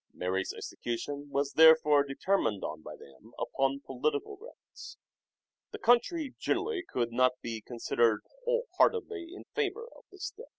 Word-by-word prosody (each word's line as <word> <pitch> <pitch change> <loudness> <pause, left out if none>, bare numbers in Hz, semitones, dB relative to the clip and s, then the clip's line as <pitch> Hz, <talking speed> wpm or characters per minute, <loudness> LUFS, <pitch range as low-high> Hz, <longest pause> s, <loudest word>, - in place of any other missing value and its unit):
Mary's 95 +1 -1
execution 140 +5 -5
was 140 0 -1
therefore 160 -2 +7
determined 135 - 0
on 80 - -5
by - - -9
them 65 -1 -17
upon 135 0 0
political 155 - -2
grounds. 455 +6 -13 0.7
The 435 - -7
country 295 - +2
generally 400 +1 -1
could 120 -2 -1
not 130 +2 +3
be 115 -1 -4
con 120 +2 -9
sidered 115 -2 +2 0.2
wholeheartedly 465 -6 +1
in 375 - -10
favour 445 +1 -1
of - - -18
this 390 0 -7
step. 475 +3 -8
150 Hz, 140 wpm, -30 LUFS, -, 0.7 s, therefore